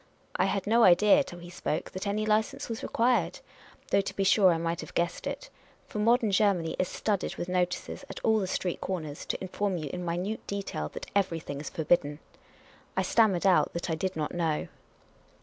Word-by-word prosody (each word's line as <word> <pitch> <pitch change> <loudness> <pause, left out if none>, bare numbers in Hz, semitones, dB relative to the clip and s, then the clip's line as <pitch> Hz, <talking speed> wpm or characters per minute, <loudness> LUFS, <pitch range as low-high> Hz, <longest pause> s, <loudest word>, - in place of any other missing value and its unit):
I 185 - +2
had 195 0 -1
no 230 +3 +4
idea, 210 +10 +6
till 175 - -10
he 175 0 -10
spoke, 155 -3 -3
that 185 +2 -5
any 210 +2 0
license 215 0 0
was 230 -1 -4
required; 245 +2 +1 0.5
though 200 - +4
to 195 - -6
be 195 - 0
sure 190 -1 +5
I 165 - +1
might 165 +1 -2
have - - -11
guessed 170 0 -1
it; - - -5 0.3
for 210 - -6
modern 225 0 +3
Ger 200 0 +4
many 165 -2 -3
is 185 - +2
studded 205 -3 -2
with 175 - -4
notices 180 +7 -2
at - - -6
all 220 -1 +3
the 190 - -1
street 180 -1 -2
corners, 155 -6 -4
to - - -2
in 190 - -6
form 200 -1 -1
you 150 -4 -5
in 180 0 -4
minute 180 +6 -3
detail 195 - -3
that - - -5
everything 165 -7 -1
is - - -5
forl)idden. 150 -2 +1 0.8
I - - +3
stammered 200 -6 +3
out 185 -2 +4
that 170 0 -3
I - - +1
did 185 +4 -2
not 155 -2 -2
know. 165 -3 -1
185 Hz, 205 wpm, -29 LUFS, 170-210 Hz, 0.8 s, idea